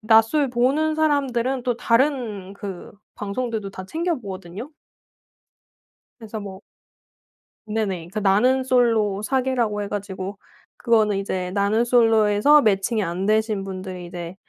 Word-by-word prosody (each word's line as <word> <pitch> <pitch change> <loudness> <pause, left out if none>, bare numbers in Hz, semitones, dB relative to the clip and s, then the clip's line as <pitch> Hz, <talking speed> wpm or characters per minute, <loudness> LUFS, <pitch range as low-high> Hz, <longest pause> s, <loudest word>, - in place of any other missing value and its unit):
나솔 225 +6 +4
보는 275 +6 +1
사람들은 270 -5 0
또 245 -2 0
다른 230 -7 0
그 195 -3 -8 0.2
방송들도 210 0 -3
다 190 -1 -8
챙겨 335 - -1
보거든요. 195 - -8 1.5
그래서 220 -1 -7
뭐 195 -1 -8 1.1
네네. 200 -6 -2
그 215 - -1
나는 230 +7 +3
솔로 225 -6 +2
사계라고 240 -3 0
해 - - -4
가지고 195 -1 -5 0.4
그거는 215 -4 +2
이제 185 -2 -3
나는 205 +4 +1
솔로에서 225 +3 +4
매칭이 210 +1 +1
안 180 +2 -3
되신 215 -1 +1
분들이 185 -2 -7
이제 175 +1 -7
215 Hz, 265 characters per minute, -23 LUFS, 195-245 Hz, 1.5 s, 나솔